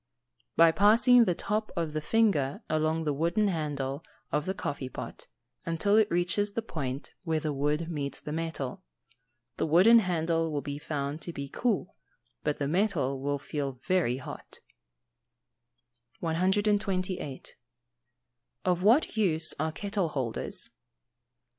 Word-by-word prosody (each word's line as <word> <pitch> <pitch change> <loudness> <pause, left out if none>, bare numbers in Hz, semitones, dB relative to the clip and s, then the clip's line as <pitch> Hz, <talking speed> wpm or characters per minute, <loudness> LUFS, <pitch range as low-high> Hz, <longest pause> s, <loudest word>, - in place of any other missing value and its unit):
_ - - -36
By 165 0 +7
passing 230 +6 +6
the 180 - +1
top 215 +4 -2
of 165 -3 -2
the 155 - -1
finger 155 -8 +1
along 155 +1 +1
the 150 -2 0
wooden 170 +8 +1
handle 145 -4 -2 0.3
of 150 - 0
the 190 - -1
coffee 140 -7 -4
pot, - - -8 0.4
until 170 +5 +1
it 220 -1 +5
reaches 185 +4 0
the 230 - -2
point 140 - -5
where 160 -3 0
the 155 -1 -2
wood 150 +4 0
meets 145 -4 -3
the 150 - -6
metal. 160 -5 -3 0.8
The - - 0
wooden 190 +9 +7
handle 165 -4 0
will 145 -1 -2
be 145 0 -5
found 145 0 -3
to 170 - -4
be 140 -2 -5
cool, 215 - -1 0.5
but 150 -1 0
the 140 - -1
metal 155 -7 0
will 145 +1 0
feel 140 -1 -3
very 175 -10 +1
hot. 130 - -8 1.6
128. 185 -2 0 1.1
_Of 180 -1 +2
what 235 +10 +4
use 165 -7 +2
are 155 +1 0
kettle 200 0 -2
holders? 130 -6 -3
165 Hz, 140 wpm, -29 LUFS, 145-195 Hz, 1.6 s, By